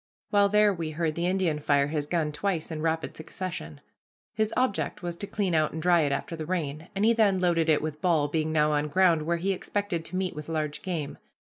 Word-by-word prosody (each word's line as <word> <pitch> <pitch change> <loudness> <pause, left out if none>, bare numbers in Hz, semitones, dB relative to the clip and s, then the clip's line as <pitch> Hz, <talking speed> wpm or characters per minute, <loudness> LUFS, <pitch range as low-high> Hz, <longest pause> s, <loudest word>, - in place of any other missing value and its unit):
While 200 -1 +4
there 210 0 +4
we 165 -3 -4
heard 160 0 -1
the 170 +2 -1
Indian 180 -5 +1
fire 145 -1 +2
his 150 -1 -2
gun 160 -2 0
twice 165 +1 -2
in 155 -1 -4
rapid 160 0 -1
succession. 155 - -6 0.5
His 215 0 0
object 250 -7 0
was 175 -1 -3
to 200 - -5
clean 195 -4 -1
out 155 -1 +2
and 160 - -4
dry 175 +1 +4
it 145 -2 +1
after 155 +4 -3
the 155 -1 -6
rain, 160 -3 -3
and 200 +2 +2
he 230 - +5
then 210 -4 +3
loaded 170 -3 +2
it 150 -1 +3
with 155 -1 -4
ball, 165 -5 +2
being 155 +1 -1
now 150 -1 +3
on 150 0 +1
ground 170 0 +3
where 170 0 +1
he 190 +4 0
expected 195 -2 -2
to 185 - -6
meet 185 -3 -1
with 150 +1 -7
large 155 -2 -2
game. 165 -7 -4
165 Hz, 230 wpm, -27 LUFS, 155-185 Hz, 0.5 s, he